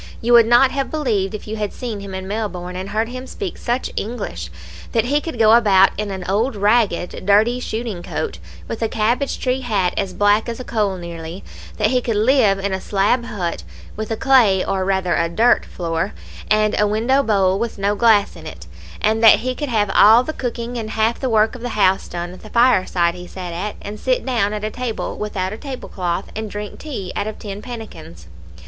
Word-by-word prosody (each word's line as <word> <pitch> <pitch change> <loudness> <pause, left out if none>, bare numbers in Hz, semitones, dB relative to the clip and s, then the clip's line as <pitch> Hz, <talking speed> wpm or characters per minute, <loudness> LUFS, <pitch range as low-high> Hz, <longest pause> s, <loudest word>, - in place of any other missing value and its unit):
You 240 +1 +1
would 235 -1 +7
not 240 +3 +5
have 275 -1 -2
believed, 220 -10 -1
if 210 - -9
you 220 +1 -4
had 210 -2 -2
seen 235 -5 -5
him 200 -1 -7
in 190 0 -6
Melbourne, 190 -4 -4
and 190 +2 -5
heard 220 +3 -1
him 255 +1 -7
speak 385 +2 -5
such 245 +2 -2
English, 200 - -4 0.4
that 225 -1 +2
he 290 +4 +1
could 325 -6 -6
go 220 -1 +5
about 195 -5 +5
in 210 0 -3
an 190 -2 -5
old 220 +6 0
ragged, 205 -3 +1
dirty 215 +5 +3
shooting 220 -6 -4
coat, 430 - -4 0.3
with 225 - -5
a 225 - 0
cabbage 235 +6 0
tree 255 0 -1
hat 200 -8 0
as 195 -2 -2
black 205 +3 +3
as 230 - -5
a - - -5
coal 210 -6 -1
nearly 170 +1 -8 0.3
that 215 +1 +2
he 250 -1 +2
could 230 -2 -2
live 220 -2 +3
in 195 0 -2
a 190 - -2
slab 210 +5 +1
hut, 175 - -3 0.3
with 215 0 -5
a 225 - -2
clay, 235 -9 +4
or 195 -1 -1
rather, 190 -2 0
a 170 0 +1
dirt 230 +8 +3
floor, 170 +2 -3 0.4
and 215 0 +3
a 210 - +4
window 230 +6 +2
bole 195 -6 +2
with 230 -1 -3
no 200 +1 +1
glass 210 -2 +3
in - - -10
it - - -10 0.4
and 220 +1 +1
that 220 -1 +8
he 255 +2 -1
could 290 +2 -4
have 210 -4 +1
all 225 +4 +7
the 315 - -4
cooking 240 -2 -4
and 215 -1 -5
half 225 +1 0
the 260 - -1
work 220 -1 +3
of 250 - -9
the 245 -3 -4
house 190 -2 +3
done 175 0 -5
at 185 - -13
the 215 - -12
fireside 190 -8 +3
he 180 0 -9
sat 180 -2 -7
at, 200 +5 -4
and 210 +1 -7
sit 255 +2 0
down 230 -6 +1
at 210 0 -4
a 215 - -2
table 250 -2 -4
without 195 -2 -3
a - - -6
table 265 0 -7
cloth, 180 0 -3
and 220 0 -4
drink 205 0 -7
tea 235 -12 -6
out 205 - -2
of 215 - -5
tin 205 -1 -7
pannikins. 220 - -9
215 Hz, 220 wpm, -20 LUFS, 195-240 Hz, 0.4 s, that